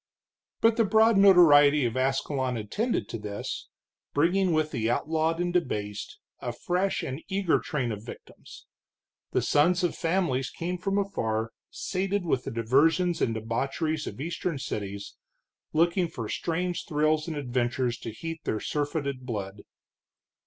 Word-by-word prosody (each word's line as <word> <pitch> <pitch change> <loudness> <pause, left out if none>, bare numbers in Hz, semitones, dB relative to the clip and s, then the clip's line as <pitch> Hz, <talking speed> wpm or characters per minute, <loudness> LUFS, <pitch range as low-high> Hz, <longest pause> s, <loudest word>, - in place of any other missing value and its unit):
But 225 0 +4
the 230 - +5
broad 220 +2 +4
notoriety 150 -8 +7
of 115 0 -1
Ascalon 130 -1 0
attended 205 - -1
to 115 - -5
this, 105 -1 -5 0.5
bringing 180 +5 +3
with 155 -1 +1
the 115 -4 -1
outlawed 160 +5 0
and 175 0 -1
debased 105 - -2 0.2
a 120 - -3
fresh 180 +10 -1
and 135 +4 -4
eager 190 -3 +1
train 130 -6 -2
of 105 -1 -6
victims. 115 - -12 0.7
The - - +1
sons 175 +6 +3
of 175 - +1
families 165 -7 0
came 180 +2 -4
from 195 +2 -1
afar, 115 - -1 0.2
sated 195 0 -2
with 135 -6 0
the - - -3
diversions 155 +10 +2
and 115 - +1
debaucheries 135 +8 -2
of - - -7
eastern 165 +1 -3
cities, 100 -6 -5 0.5
looking 170 +2 +2
for 115 -8 -6
strange 175 +7 -2
thrills 155 0 +1
and 160 -3 -3
adventures 125 -2 -1
to - - -6
heat 165 +8 -6
their 110 - -1
surfeited 145 -2 -2
blood. 100 -3 -4
150 Hz, 145 wpm, -27 LUFS, 120-175 Hz, 0.7 s, notoriety